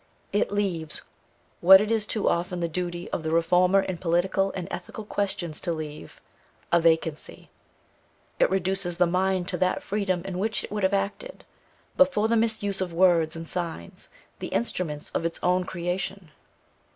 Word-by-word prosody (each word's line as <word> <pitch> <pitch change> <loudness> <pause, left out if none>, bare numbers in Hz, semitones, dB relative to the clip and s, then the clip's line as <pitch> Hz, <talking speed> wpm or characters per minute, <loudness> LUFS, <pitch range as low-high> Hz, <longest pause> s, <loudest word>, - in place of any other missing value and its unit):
It 205 - +1
leaves, 180 -6 -2 0.6
what 190 +2 +9
it 210 +2 -1
is 220 -2 0
too 215 - -1
often 175 +1 0
the 170 - 0
duty 175 +1 -4
of - - -2
the 160 - -3
reformer 180 +4 +4
in 185 -3 -4
political 185 +3 +1
and 180 -2 -4
ethical 220 - -6
questions 190 -6 -3
to 175 - -2
leave, 155 -2 -8 0.5
a 170 - +4
vacancy. 160 -2 0 0.9
It - - +4
reduces 190 -2 -1
the 180 - +5
mind 185 +1 0
to - - -1
that 185 0 +1
freedom 195 -4 -1
in 185 -2 -4
which 220 +3 0
it - - -8
would 210 0 -2
have 190 +1 +2
acted, 195 +1 -4 0.5
but 275 0 +6
for 215 -3 +1
the 230 - +2
misuse 220 -4 0
of 185 -2 -2
words 170 -2 +3
and 165 0 -7
signs, 165 - -6 0.3
the - - -4
instruments 150 +5 -3
of - - -2
its 165 0 -3
own 180 0 +2
creation. 180 0 -4
180 Hz, 170 wpm, -26 LUFS, 170-195 Hz, 0.9 s, what